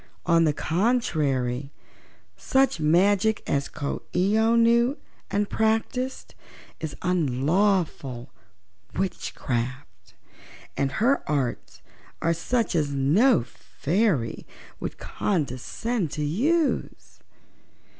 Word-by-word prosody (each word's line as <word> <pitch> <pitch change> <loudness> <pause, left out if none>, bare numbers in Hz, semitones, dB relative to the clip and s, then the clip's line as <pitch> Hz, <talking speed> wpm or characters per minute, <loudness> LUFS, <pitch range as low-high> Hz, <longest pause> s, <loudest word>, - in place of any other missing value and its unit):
On 170 -1 +4
the 155 - +3
contrary, 145 - 0 0.6
such 265 -8 +1
magic 195 +7 +3
as 140 0 0
Coo 145 - -4
ee 190 +4 +2
oh 225 +1 +3
knew 235 +4 +4 0.3
and 205 0 0
practiced 225 +5 -1 0.5
is 160 -3 -5
unlawful 155 -4 0 0.6
witchcraft 130 - -4 0.6
and 140 0 -1
her 245 - +2
arts 135 -5 -2 0.4
are 165 0 +1
such 230 +7 -1
as 155 -4 +1
no 160 - +3
fairy 155 - -1 0.3
would - - -5
condescend 175 - -2
to 150 - -2
use. 285 - -1
170 Hz, 90 wpm, -25 LUFS, 140-220 Hz, 0.6 s, On